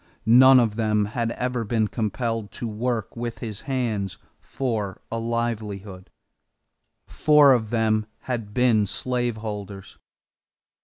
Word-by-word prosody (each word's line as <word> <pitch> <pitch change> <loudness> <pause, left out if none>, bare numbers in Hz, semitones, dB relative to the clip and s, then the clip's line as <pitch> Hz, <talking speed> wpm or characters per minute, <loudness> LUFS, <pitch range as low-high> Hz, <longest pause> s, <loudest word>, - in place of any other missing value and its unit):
None 130 +3 +8
of 110 -3 0
them 105 -2 +1
had 115 -2 -1
ever 125 -1 -2
been 110 0 0
compelled 115 -1 -3
to 120 - -5
work 115 -1 -3
with 115 -1 -4
his 110 -3 -6
hands 110 -7 -2 0.2
for 110 -7 -3
a 115 - -2
livelihood. 105 -5 -4 1.0
Four 150 -3 +5
of 110 -4 0
them 110 -2 +1
had 115 -5 -4
been 115 -3 +3
slaveholders. 110 -5 -4
115 Hz, 115 wpm, -24 LUFS, 105-120 Hz, 1.0 s, None